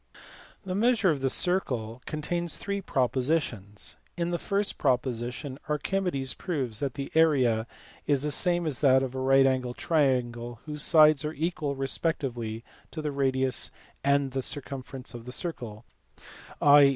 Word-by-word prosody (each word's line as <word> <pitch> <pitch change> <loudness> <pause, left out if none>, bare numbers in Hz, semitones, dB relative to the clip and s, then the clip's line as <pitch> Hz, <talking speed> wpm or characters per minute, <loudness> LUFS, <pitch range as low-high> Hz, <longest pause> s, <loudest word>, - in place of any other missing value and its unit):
(a) - - -8
The - - 0
Measure 220 -2 +3
of 145 -3 -2
the 135 - +2
Circle 125 -11 -1
contains 170 +3 -1
three 200 0 -3
propositions. 125 - -1 0.2
In 170 0 -1
the 175 - -1
first 200 +2 0
proposition 125 +2 -1
Archimedes 150 -3 -1
proves 130 - -2
that 140 -3 -2
the 140 -1 -5
area 130 -9 +3 0.4
is 140 -2 +2
the 150 - 0
same 175 +2 +2
as 145 -6 -1
that 130 -2 +5
of 130 -1 -3
a 130 - -4
right 135 +1 +5
angled 130 -2 0
triangle 120 -6 0
whose 150 -1 -3
sides 155 -2 +6
are 150 +1 -3
equal 155 -2 -2
respectively 125 -5 -2 0.3
to 155 - -6
the 150 - -1
radius 130 -2 0 0.3
a - - -3
and 140 -1 +3
the 135 +1 -1
circumference 135 -1 -6
of 120 -1 -9
the 125 - -7
circle, 120 - -5 0.7
i. 145 -1 +7
140 Hz, 155 wpm, -28 LUFS, 125-160 Hz, 0.7 s, i